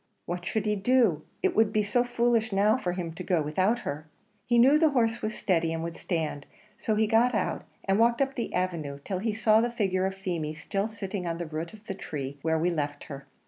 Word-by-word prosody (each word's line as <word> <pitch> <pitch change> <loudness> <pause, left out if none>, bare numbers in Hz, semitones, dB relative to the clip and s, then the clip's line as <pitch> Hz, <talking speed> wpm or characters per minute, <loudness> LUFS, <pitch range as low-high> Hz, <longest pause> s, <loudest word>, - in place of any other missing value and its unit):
What 175 +1 -4
should 220 -1 -1
he 210 0 +1
do? 210 - +3 0.2
It 380 -2 +2
would 220 -1 +4
be 215 -1 +2
so 210 +4 +2
foolish 235 -2 +1
now 205 +2 +4
for 180 -9 -2
him 175 -3 -4
to 180 +2 -7
go 180 -2 +1
without 190 +10 +1
her! 150 -3 -5 0.4
He 240 - +3
knew 270 +6 +6
the 320 -1 +5
horse 235 -4 +1
was 215 +1 -2
steady 165 -4 +1
and 165 0 -3
would 170 0 -5
stand; 155 -5 -3 0.3
so 220 - 0
he 220 +1 +3
got 225 +2 +3
out - - -1 0.2
and 195 +1 +2
walked 235 +1 +4
up 275 0 +1
the 240 - -3
avenue 170 -6 -2
till 190 -2 -2
he 215 +1 -1
saw 220 0 +4
the 240 - +1
figure 190 -5 0
of 190 - -4
Feemy, 170 -6 -3
still 195 +6 -2
sitting 200 -4 -5
on 165 0 -2
the 175 - -4
root 160 +1 -5
of 215 0 -14
the 195 - -4
tree 140 -6 -6
where 160 +1 +1
we 170 +3 +1
left 145 -3 -3
her. 140 0 -10
195 Hz, 235 wpm, -28 LUFS, 165-225 Hz, 0.4 s, knew